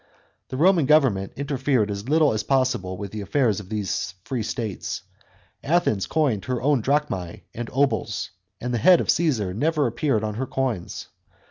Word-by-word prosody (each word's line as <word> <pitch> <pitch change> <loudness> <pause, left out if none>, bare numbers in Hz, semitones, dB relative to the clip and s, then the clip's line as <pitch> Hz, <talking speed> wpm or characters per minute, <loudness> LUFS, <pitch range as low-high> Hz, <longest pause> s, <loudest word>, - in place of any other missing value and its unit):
The 130 - -5
Roman 170 -2 +4
government 130 -11 +3
interfered 135 -6 0
as 100 +5 -5
little 155 -3 +4
as 110 - 0
possible 125 -8 0
with 100 0 -6
the 110 - -5
affairs 110 -1 +1
of 100 -3 -11
these 100 -2 -2
free 120 +1 -3
states. 110 -2 -4 0.6
Athens 140 - +1
coined 135 - 0
her 125 -1 -1
own 140 0 +2
drachmae 120 - -1
and 120 0 -5
obols, 130 -7 0 0.3
and 125 +1 -3
the 120 - +1
head 180 - +6
of - - +2
Caesar 120 - 0
never 150 - +1
appeared 120 -1 0
on 105 -1 -2
her 130 - -2
coins. 125 -10 -3
125 Hz, 165 wpm, -24 LUFS, 105-145 Hz, 0.6 s, head